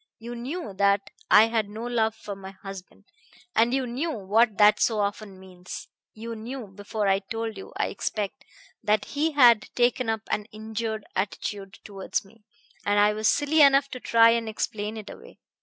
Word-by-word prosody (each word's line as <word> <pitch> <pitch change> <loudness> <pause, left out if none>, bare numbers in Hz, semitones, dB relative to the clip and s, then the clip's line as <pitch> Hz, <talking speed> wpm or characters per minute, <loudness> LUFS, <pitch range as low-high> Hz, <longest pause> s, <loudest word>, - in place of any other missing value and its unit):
You 235 +1 -8
knew 255 - -5
that 200 0 +2 0.2
I 215 - +8
had 225 -2 -1
no 220 +3 -6
love 225 -2 0
for 205 -2 -7
my 190 -1 -9
husband, 195 -1 -11 0.5
and 230 +2 +4
you 265 0 0
knew 255 +8 -2
what 220 -2 +1
that 210 0 +6
so 220 -2 +2
often 200 -1 -3
means. 180 -1 -10 0.3
You 230 +1 -6
knew 235 +3 -6
before 205 +1 -4
I 195 0 +3
told 225 +2 -5
you, 195 - -10
I - - 0
expect, 205 -1 -4 0.4
that 210 0 +2
he 305 +2 -1
had 240 -6 +6
taken 245 -1 +2
up 220 -1 -1
an 210 - -1
injured 220 0 -5
attitude 195 0 -4
towards 195 -1 -4
me; 210 +3 -21 0.4
and 205 0 +2
I 210 +1 +4
was 215 +1 0
silly 295 +2 +3
enough 275 -1 +6
to 255 - -7
try 230 -1 +5
and 230 -1 0
explain 215 0 -3
it 215 -1 -8
away. - - -12
220 Hz, 180 wpm, -26 LUFS, 205-235 Hz, 0.5 s, I